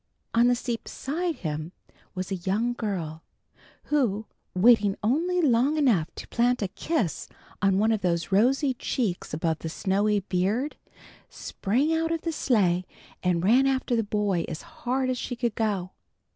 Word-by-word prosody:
On 235 Hz, +1 st, +5 dB
the 245 Hz, -, +4 dB
seat 235 Hz, -1 st, -4 dB
beside 330 Hz, +5 st, -3 dB
him 155 Hz, -, -4 dB, 0.4 s
was 185 Hz, +1 st, -4 dB
a -, -, +1 dB
young 215 Hz, +7 st, 0 dB
girl, 175 Hz, -9 st, -4 dB, 0.6 s
who, 225 Hz, -8 st, 0 dB, 0.3 s
waiting 205 Hz, 0 st, +5 dB
only 340 Hz, +10 st, +1 dB
long 270 Hz, +3 st, +3 dB
enough 220 Hz, -, +3 dB
to -, -, -8 dB
plant 245 Hz, -1 st, +2 dB
a 195 Hz, -, -2 dB
kiss 280 Hz, -, -2 dB, 0.3 s
on 195 Hz, -1 st, +3 dB
one 220 Hz, +3 st, +3 dB
of 220 Hz, -2 st, 0 dB
those 170 Hz, 0 st, -1 dB
rosy 260 Hz, +7 st, +3 dB
cheeks 230 Hz, -6 st, -2 dB
above 160 Hz, +1 st, -1 dB
the 165 Hz, -, -5 dB
snowy 200 Hz, +4 st, +1 dB
beard, 200 Hz, +10 st, -1 dB, 0.5 s
sprang 265 Hz, +11 st, -1 dB
out 325 Hz, 0 st, 0 dB
of 330 Hz, -1 st, -1 dB
the 330 Hz, -, -2 dB
sleigh 195 Hz, -, +2 dB, 0.4 s
and 175 Hz, -2 st, +1 dB
ran 250 Hz, +7 st, +5 dB
after 260 Hz, -2 st, +1 dB
the 230 Hz, -, +2 dB
boy 205 Hz, -4 st, 0 dB
as 160 Hz, -1 st, -6 dB
hard 270 Hz, -5 st, -2 dB
as 250 Hz, -, -2 dB
she 245 Hz, -, -4 dB
could 235 Hz, -2 st, -1 dB
go. 200 Hz, -5 st, -1 dB
220 Hz, 160 wpm, -26 LUFS, 185-260 Hz, 0.6 s, On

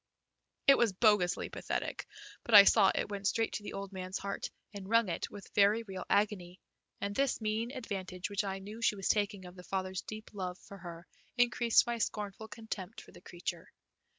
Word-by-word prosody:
It 275 Hz, -, +7 dB
was 230 Hz, -5 st, +3 dB
bogusly 190 Hz, -3 st, +3 dB
pathetic, -, -, -3 dB, 0.4 s
but 230 Hz, -, +3 dB
I 200 Hz, -, +13 dB
saw 195 Hz, -1 st, +5 dB
it -, -, -1 dB
went 200 Hz, -1 st, -2 dB
straight 225 Hz, +2 st, 0 dB
to -, -, -3 dB
the -, -, -6 dB
old 200 Hz, 0 st, -6 dB
man's 185 Hz, 0 st, -4 dB
heart 200 Hz, 0 st, -4 dB, 0.2 s
and 200 Hz, -1 st, -8 dB
wrung 230 Hz, -3 st, +4 dB
it 170 Hz, -, -3 dB
with 200 Hz, -, -10 dB
very 210 Hz, +3 st, +4 dB
real 190 Hz, -4 st, -7 dB
agony, 195 Hz, -4 st, 0 dB, 0.4 s
and 200 Hz, 0 st, -3 dB
this 275 Hz, +2 st, +1 dB
mean 220 Hz, +1 st, -1 dB
advantage 195 Hz, -8 st, -5 dB
which 205 Hz, 0 st, -1 dB
I 195 Hz, -1 st, -3 dB
knew 210 Hz, +4 st, -9 dB
she 220 Hz, -, +3 dB
was 195 Hz, -2 st, -2 dB
taking 205 Hz, -2 st, 0 dB
of 180 Hz, 0 st, -11 dB
the 180 Hz, -, -10 dB
father's 185 Hz, 0 st, -3 dB
deep 215 Hz, 0 st, -9 dB
love 185 Hz, -3 st, -4 dB
for 200 Hz, 0 st, -13 dB
her 170 Hz, -1 st, -9 dB, 0.3 s
increased 240 Hz, -1 st, +4 dB
my 240 Hz, -1 st, -2 dB
scornful 210 Hz, 0 st, -3 dB
contempt 220 Hz, -3 st, -7 dB
for -, -, -14 dB
the -, -, -15 dB
creature. 175 Hz, -1 st, -6 dB
200 Hz, 195 wpm, -32 LUFS, 185-220 Hz, 0.4 s, I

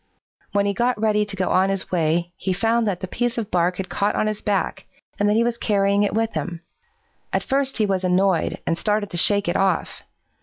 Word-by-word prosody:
When 200 Hz, 0 st, +1 dB
he 200 Hz, -, +1 dB
got 240 Hz, +2 st, 0 dB
ready 210 Hz, -1 st, +1 dB
to 200 Hz, -, -7 dB
go 185 Hz, -2 st, -1 dB
on 190 Hz, +1 st, +3 dB
his 195 Hz, -1 st, -2 dB
way, 170 Hz, 0 st, 0 dB
he 190 Hz, 0 st, -2 dB
found 225 Hz, +4 st, +1 dB
that 190 Hz, -4 st, -2 dB
the 185 Hz, -, -4 dB
piece 240 Hz, +5 st, -2 dB
of 225 Hz, -3 st, -3 dB
bark 180 Hz, 0 st, +1 dB
had 190 Hz, -, -4 dB
caught 205 Hz, +2 st, -1 dB
on -, -, +1 dB
his 215 Hz, -1 st, -2 dB
back, 200 Hz, -2 st, -2 dB, 0.3 s
and 205 Hz, 0 st, +3 dB
that 210 Hz, -, +2 dB
he 230 Hz, -, +3 dB
was 235 Hz, 0 st, -1 dB
carrying 200 Hz, -1 st, +2 dB
it 205 Hz, -, 0 dB
with 225 Hz, 0 st, 0 dB
him. 170 Hz, -2 st, -4 dB, 0.7 s
At -, -, 0 dB
first 270 Hz, 0 st, -1 dB
he 220 Hz, -, +2 dB
was 190 Hz, -2 st, -1 dB
annoyed 185 Hz, -1 st, +1 dB
and 165 Hz, 0 st, -1 dB
started 210 Hz, -1 st, 0 dB
to 175 Hz, -, -3 dB
shake 200 Hz, +3 st, +4 dB
it 175 Hz, -, 0 dB
off. 190 Hz, -3 st, 0 dB
200 Hz, 230 wpm, -22 LUFS, 185-215 Hz, 0.7 s, shake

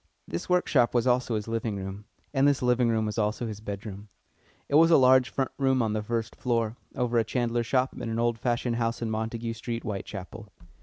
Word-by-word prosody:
This 85 Hz, -, -5 dB
workshop 145 Hz, -10 st, +3 dB
was 120 Hz, -, +3 dB
also 125 Hz, -2 st, +2 dB
his 105 Hz, 0 st, -3 dB
living 115 Hz, -2 st, -2 dB
room, 95 Hz, +1 st, -6 dB, 0.3 s
and 135 Hz, 0 st, +4 dB
this 140 Hz, -2 st, +2 dB
living 125 Hz, -1 st, +3 dB
room 110 Hz, -1 st, +1 dB
was 105 Hz, +1 st, -2 dB
also 105 Hz, +3 st, 0 dB
his 105 Hz, -2 st, -6 dB
bedroom. 100 Hz, 0 st, -7 dB, 0.6 s
It -, -, -7 dB
was 165 Hz, +3 st, +7 dB
a 165 Hz, -, +7 dB
large 130 Hz, -1 st, +5 dB
front 135 Hz, -1 st, -2 dB
room 130 Hz, -2 st, +3 dB
on 110 Hz, -1 st, 0 dB
the 110 Hz, -, -1 dB
first 115 Hz, +1 st, -3 dB
floor, 115 Hz, -2 st, 0 dB, 0.2 s
over 125 Hz, -2 st, +1 dB
a -, -, +3 dB
chandler's 120 Hz, -1 st, -1 dB
shop 130 Hz, +1 st, +1 dB
in 115 Hz, -, -5 dB
an 115 Hz, -, -2 dB
old 120 Hz, -1 st, +1 dB
fashioned 120 Hz, 0 st, 0 dB
house 115 Hz, 0 st, -1 dB
in 110 Hz, -, -2 dB
Montague 115 Hz, +1 st, -3 dB
Street, 115 Hz, 0 st, -5 dB
Whitechapel. 100 Hz, 0 st, -6 dB
115 Hz, 210 wpm, -27 LUFS, 110-125 Hz, 0.6 s, was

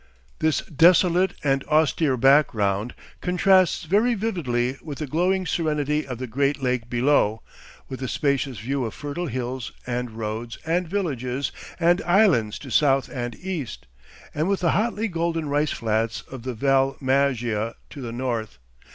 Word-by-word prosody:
This 160 Hz, -1 st, +1 dB
desolate 175 Hz, +3 st, +4 dB
and 135 Hz, -1 st, +1 dB
austere 155 Hz, -2 st, +2 dB
background 115 Hz, -6 st, +3 dB, 0.3 s
contrasts 185 Hz, 0 st, +3 dB
very 210 Hz, +8 st, +2 dB
vividly 140 Hz, -, -1 dB
with 145 Hz, -3 st, -7 dB
the 155 Hz, -, -3 dB
glowing 180 Hz, +6 st, +1 dB
serenity 150 Hz, -3 st, 0 dB
of 125 Hz, -2 st, -5 dB
the 130 Hz, -, -4 dB
great 140 Hz, +4 st, 0 dB
lake 125 Hz, -3 st, -1 dB
below, 120 Hz, -3 st, +2 dB, 0.4 s
with 130 Hz, -, -7 dB
the 130 Hz, -, -3 dB
spacious 140 Hz, -2 st, 0 dB
view 130 Hz, +6 st, -2 dB
of 115 Hz, -, -4 dB
fertile 150 Hz, +4 st, -4 dB
hills 125 Hz, -1 st, -4 dB
and 125 Hz, 0 st, -2 dB
roads 110 Hz, +1 st, -5 dB
and 170 Hz, +2 st, 0 dB
villages 140 Hz, -8 st, -2 dB, 0.3 s
and 175 Hz, +1 st, +3 dB
islands 175 Hz, -, +3 dB
to 135 Hz, -, -10 dB
south 135 Hz, -2 st, +3 dB
and 120 Hz, -2 st, -4 dB
east, 140 Hz, -, -5 dB, 0.5 s
and 155 Hz, +5 st, 0 dB
with 200 Hz, -2 st, 0 dB
the 170 Hz, -, +3 dB
hotly 225 Hz, +1 st, 0 dB
golden 165 Hz, -3 st, -2 dB
rice 145 Hz, +1 st, +1 dB
flats 110 Hz, 0 st, -1 dB
of 130 Hz, -2 st, -7 dB
the 125 Hz, 0 st, -5 dB
Val 135 Hz, +2 st, +2 dB
Maggia 125 Hz, -5 st, 0 dB, 0.2 s
to 145 Hz, -, -8 dB
the 120 Hz, -2 st, -5 dB
north. 120 Hz, -3 st, -3 dB
140 Hz, 150 wpm, -24 LUFS, 120-165 Hz, 0.5 s, desolate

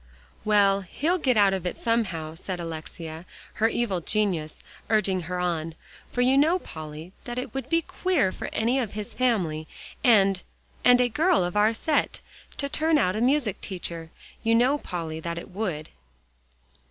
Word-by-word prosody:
"Well, 200 Hz, -2 st, +4 dB
he'll 315 Hz, -, -1 dB
get 255 Hz, -6 st, +2 dB
out 200 Hz, -2 st, +5 dB
of 190 Hz, -3 st, -2 dB
it -, -, -4 dB
somehow," 190 Hz, -10 st, -1 dB
said 180 Hz, +2 st, -6 dB
Alexia, 160 Hz, 0 st, -6 dB, 0.4 s
her 225 Hz, -, +6 dB
evil 210 Hz, -7 st, -1 dB
genius 180 Hz, -6 st, -1 dB, 0.3 s
urging 195 Hz, -4 st, +2 dB
her 180 Hz, 0 st, -2 dB
on, 165 Hz, -2 st, -1 dB, 0.4 s
"for 245 Hz, -, 0 dB
you 260 Hz, +2 st, +5 dB
know, 325 Hz, +5 st, +4 dB
Polly, 155 Hz, -, -8 dB, 0.2 s
it 245 Hz, +1 st, -4 dB
would 270 Hz, 0 st, -4 dB
be 330 Hz, 0 st, +3 dB
too -, -, -30 dB
queer 360 Hz, -, +3 dB
for -, -, -6 dB
any 240 Hz, +4 st, +1 dB
of 230 Hz, -6 st, -3 dB
his 210 Hz, -1 st, -5 dB
family, 180 Hz, -11 st, 0 dB, 0.4 s
and 195 Hz, -5 st, +5 dB, 0.4 s
and 245 Hz, 0 st, +7 dB
a 250 Hz, -, +4 dB
girl 315 Hz, -, +3 dB
of 175 Hz, +2 st, -3 dB
our 210 Hz, +1 st, +4 dB
set, 300 Hz, +6 st, 0 dB, 0.4 s
to 280 Hz, -, 0 dB
turn 315 Hz, +2 st, +2 dB
out 185 Hz, -9 st, +2 dB
a 215 Hz, -, -1 dB
music 250 Hz, -5 st, +1 dB
teacher. 170 Hz, -4 st, -5 dB, 0.3 s
You 225 Hz, 0 st, +3 dB
know, 255 Hz, +5 st, +3 dB
Polly, 165 Hz, -, -5 dB
that 170 Hz, +1 st, -4 dB
it 170 Hz, -, -8 dB
would." 180 Hz, -6 st, -3 dB
205 Hz, 170 wpm, -26 LUFS, 170-250 Hz, 0.4 s, and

